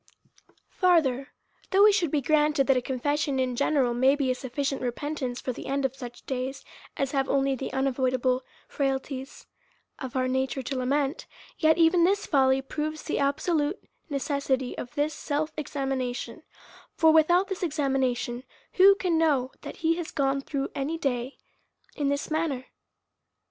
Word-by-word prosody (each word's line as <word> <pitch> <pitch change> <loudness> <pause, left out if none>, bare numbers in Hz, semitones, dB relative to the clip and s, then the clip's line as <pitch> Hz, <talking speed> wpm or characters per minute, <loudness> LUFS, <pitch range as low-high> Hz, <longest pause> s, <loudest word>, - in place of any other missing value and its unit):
Farther: 300 -8 +2 0.4
Though 395 +2 +6
it 425 - +8
should 370 -6 +1
be 290 0 0
granted, 300 0 +3
that 270 - +4
a 250 - +2
con 255 +1 -4
fession 290 0 0
in 255 -1 0
general 265 -2 +2
be 265 +2 +3
a - - +2
sufficient 270 +2 -3
repentance 255 0 -3
for 255 - -3
the - - -8
end 275 0 0
of 265 0 -1
such 245 -2 -9
days 265 +1 -4 0.3
as 275 -1 -1
have 270 -1 0
only 275 0 +2
the 265 0 -4
unavoidable 255 -1 +1 0.3
frailties 270 -1 -3 0.5
of 260 -2 -6
our 255 0 +1
nature 265 +1 -1
to 260 +2 -4
lament, 275 +4 -1 0.3
yet 315 0 +4
even 335 +1 +5
this 400 +4 +2
fully 265 -2 +3
proves 305 +3 -4
the - - -2
absolute 295 +5 0 0.3
necessity 275 -2 -1
of 245 - -7
this 295 +1 0
self 300 +1 -2
examination: 270 -2 -3 0.5
for 320 -1 +5
without 345 +4 +4
this 385 -2 -5
examination, 265 -6 -1 0.3
who 390 +1 +7
can 360 -5 0
know 275 -5 +2
that - - -8
he 330 +1 +3
has 345 -2 -4
gone 275 -1 0
through 275 0 -3
any 290 +4 -2
day 260 -3 -2 0.6
in 285 -2 0
this 285 +2 -2
manner? 310 -5 -1
275 Hz, 160 wpm, -27 LUFS, 260-310 Hz, 0.6 s, it